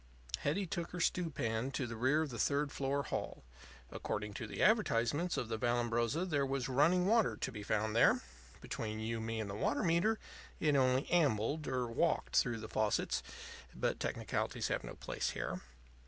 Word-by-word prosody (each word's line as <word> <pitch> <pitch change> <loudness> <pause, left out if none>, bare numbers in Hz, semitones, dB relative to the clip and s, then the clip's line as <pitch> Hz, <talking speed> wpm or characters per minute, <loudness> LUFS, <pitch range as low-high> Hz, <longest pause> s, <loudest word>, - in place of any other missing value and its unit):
Hetty 190 +7 0
took 170 -1 -3
her 180 - -4
stew 170 0 +1
pan 115 -3 -1
to 130 - -1
the 115 -1 -5
rear 130 +7 +3
of 150 - -5
the 120 - -6
third 145 +3 +1
floor 140 +1 -1
hall. - - -4 0.5
According 105 0 -3
to 115 - -5
the - - -2
advertisements 170 - +2
of 120 - -1
the 110 -1 -3
Vallambrosa 120 +5 +1
there 145 -5 +1
was 135 -2 -1
running 155 +8 +4
water 225 +1 +3
to - - -3
be 105 - -7
found 110 +1 0
there. 115 - +5 0.4
Between 110 -1 -4
you 115 +1 -2
and 110 0 -4
me 115 0 -2
and 110 - -2
the 100 - -5
water 105 - 0
meter, 175 +6 +3 0.4
it 150 -2 +3
only 130 0 +3
ambled 145 -2 +2
or 130 -1 0
walked 115 -1 0
through 120 -2 +3
the 110 - -6
faucets; 105 - 0 0.5
but - - -1
technicalities - - -2
have - - -1
no - - -7
place - - -2
here. - - -3
130 Hz, 185 wpm, -35 LUFS, 115-155 Hz, 0.5 s, there